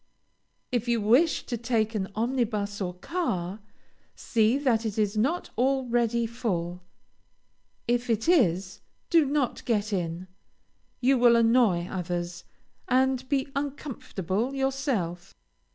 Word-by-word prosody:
If 245 Hz, -1 st, -1 dB
you 235 Hz, -1 st, +2 dB
wish 245 Hz, +11 st, +3 dB
to 240 Hz, -, -3 dB
take 225 Hz, -1 st, 0 dB
an 195 Hz, -3 st, -2 dB
omnibus 215 Hz, -4 st, -1 dB
or 180 Hz, -2 st, -3 dB
car, 190 Hz, -, -3 dB, 0.6 s
see 230 Hz, +1 st, +2 dB
that 250 Hz, -6 st, +1 dB
it 220 Hz, -2 st, -3 dB
is 210 Hz, -1 st, +1 dB
not 275 Hz, +12 st, 0 dB
already 240 Hz, -3 st, +1 dB
full. 180 Hz, -7 st, -3 dB, 1.1 s
If 240 Hz, +1 st, 0 dB
it 225 Hz, +2 st, 0 dB
is, 190 Hz, -, +2 dB, 0.3 s
do 330 Hz, -3 st, +5 dB
not 280 Hz, -2 st, -1 dB
get 215 Hz, -3 st, 0 dB
in. 175 Hz, -1 st, -3 dB, 0.7 s
You 260 Hz, +1 st, +3 dB
will 240 Hz, -1 st, +6 dB
annoy 230 Hz, -6 st, +3 dB
others, 175 Hz, -1 st, -4 dB, 0.4 s
and 260 Hz, 0 st, +1 dB
be 275 Hz, -1 st, 0 dB
uncomfortable 265 Hz, -, -3 dB
yourself. 265 Hz, -, -2 dB
230 Hz, 120 wpm, -27 LUFS, 195-260 Hz, 1.1 s, will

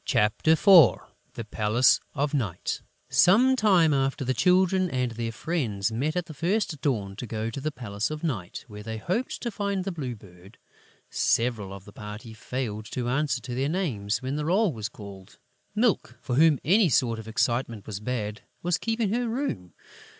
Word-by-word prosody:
CHAPTER 105 Hz, +9 st, +2 dB
IV 170 Hz, -, +7 dB, 0.4 s
THE 115 Hz, -, -5 dB
PALACE 110 Hz, +3 st, +3 dB, 0.2 s
OF 145 Hz, +1 st, -1 dB
NIGHT 110 Hz, -, -2 dB, 0.3 s
Some 245 Hz, +9 st, +5 dB
time 185 Hz, -, +4 dB
after, 135 Hz, 0 st, 0 dB
the 130 Hz, -, +1 dB
Children 185 Hz, +5 st, +3 dB
and 125 Hz, -4 st, -1 dB
their 115 Hz, 0 st, -3 dB
friends 115 Hz, -, -2 dB
met 140 Hz, +8 st, -1 dB
at 180 Hz, -1 st, -1 dB
the 160 Hz, -, -9 dB
first 170 Hz, 0 st, -1 dB
dawn 105 Hz, -10 st, -1 dB
to 120 Hz, -, -6 dB
go 110 Hz, +1 st, -3 dB
to 135 Hz, -, -6 dB
the 155 Hz, +2 st, -2 dB
Palace 105 Hz, -5 st, -3 dB
of 155 Hz, +1 st, -6 dB
Night, 105 Hz, -, -4 dB
where 105 Hz, -2 st, -9 dB
they 110 Hz, +1 st, -5 dB
hoped 185 Hz, -, -2 dB
to 235 Hz, -, -3 dB
find 200 Hz, -2 st, -2 dB
the 195 Hz, -, -3 dB
Blue 135 Hz, -8 st, -4 dB
Bird. 95 Hz, -1 st, -17 dB, 0.5 s
Several 115 Hz, -5 st, +1 dB
of 100 Hz, 0 st, -10 dB
the 100 Hz, -, -13 dB
party 105 Hz, +3 st, -8 dB
failed 110 Hz, -1 st, -4 dB
to 120 Hz, -1 st, -2 dB
answer 135 Hz, -1 st, 0 dB
to 120 Hz, -, -6 dB
their 135 Hz, +3 st, 0 dB
names 120 Hz, -, -2 dB
when 135 Hz, +3 st, -2 dB
the 150 Hz, -, -2 dB
roll 190 Hz, +1 st, +2 dB
was 110 Hz, -2 st, -4 dB
called. 100 Hz, -2 st, -12 dB, 0.4 s
Milk, 210 Hz, -, +1 dB
for 125 Hz, -, -5 dB
whom 155 Hz, +2 st, +5 dB
any 190 Hz, +3 st, +4 dB
sort 115 Hz, -4 st, +2 dB
of 110 Hz, -, -9 dB
excitement 115 Hz, -1 st, -1 dB
was 100 Hz, -2 st, -5 dB
bad, 105 Hz, -1 st, -3 dB, 0.2 s
was 175 Hz, -1 st, +1 dB
keeping 225 Hz, -2 st, -1 dB
her 240 Hz, 0 st, 0 dB
room. 225 Hz, -, -3 dB
130 Hz, 185 wpm, -26 LUFS, 110-170 Hz, 0.5 s, IV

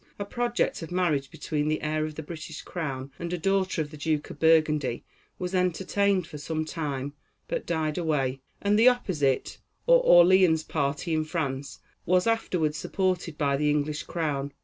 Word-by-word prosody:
A 200 Hz, -, -4 dB
project 240 Hz, 0 st, -1 dB
of 165 Hz, -, -7 dB
marriage 165 Hz, -7 st, 0 dB
between 150 Hz, -2 st, -2 dB
the 155 Hz, 0 st, -1 dB
heir 155 Hz, 0 st, 0 dB
of 155 Hz, -1 st, -6 dB
the 160 Hz, -, -6 dB
British 160 Hz, 0 st, -8 dB
crown 140 Hz, -6 st, -5 dB
and 170 Hz, 0 st, -4 dB
a 180 Hz, -, -1 dB
daughter 190 Hz, -1 st, +1 dB
of 150 Hz, -, -11 dB
the 155 Hz, -, -9 dB
Duke 150 Hz, 0 st, -1 dB
of -, -, -11 dB
Burgundy, 155 Hz, -6 st, +3 dB, 0.3 s
was 180 Hz, 0 st, -4 dB
entertained 185 Hz, +1 st, +1 dB
for 150 Hz, -, -9 dB
some 155 Hz, +2 st, -3 dB
time, 145 Hz, -4 st, -4 dB, 0.3 s
but -, -, -3 dB
died 160 Hz, 0 st, -1 dB
away, 135 Hz, -5 st, 0 dB, 0.2 s
and 205 Hz, +1 st, +3 dB
the 240 Hz, +3 st, +8 dB
opposite, 155 Hz, -, 0 dB, 0.3 s
or -, -, +6 dB
Orleans 175 Hz, -, +6 dB
party 145 Hz, +2 st, -2 dB
in 155 Hz, 0 st, +1 dB
France, 145 Hz, -4 st, -4 dB, 0.3 s
was 180 Hz, +1 st, +3 dB
afterward 180 Hz, -9 st, +1 dB
supported 180 Hz, -2 st, -2 dB
by 140 Hz, -2 st, +1 dB
the 150 Hz, +1 st, +1 dB
English 150 Hz, 0 st, 0 dB
Crown. 145 Hz, -4 st, -3 dB
160 Hz, 170 wpm, -27 LUFS, 150-180 Hz, 0.3 s, the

